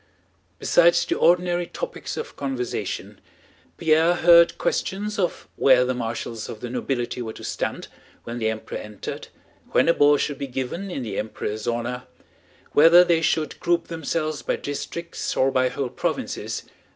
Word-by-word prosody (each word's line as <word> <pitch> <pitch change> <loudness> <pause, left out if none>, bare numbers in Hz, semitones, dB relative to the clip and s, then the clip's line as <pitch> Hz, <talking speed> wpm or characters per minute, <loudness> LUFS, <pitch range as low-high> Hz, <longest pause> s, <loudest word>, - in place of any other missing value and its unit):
Besides - - +4
the - - 0
ordinary 175 - +2
topics - - -6
of 460 - -6
conversation, 130 -3 -4 0.6
Pierre 160 +1 +3
heard 170 0 +6
questions 205 +2 -2
of 180 - -1
where 130 -2 +5
the 130 - 0
marshals 115 -2 -4
of 110 - -7
the 120 - -6
nobility 125 -1 -2
were 110 -2 -5
to - - -11
stand - - -3 0.4
when 120 +1 -5
the 110 -1 +1
Emperor 110 0 -5
entered, 105 -1 -7 0.5
when - - +4
a 170 - +6
ball 145 -1 +5
should 145 0 -2
be 140 - -3
given 135 +10 -4
in 140 -8 -4
the 105 -4 -3
Emperor's 110 0 -4
honor, 120 +1 -2 0.7
whether 165 +4 +8
they 170 -2 +2
should 155 -1 0
group 170 -1 0
themselves 160 -1 -2
by - - -1
districts 170 +4 -5
or 135 +1 +3
by 130 -1 +2
whole 130 0 -3
provinces... - - -3
145 Hz, 155 wpm, -24 LUFS, 125-170 Hz, 0.7 s, whether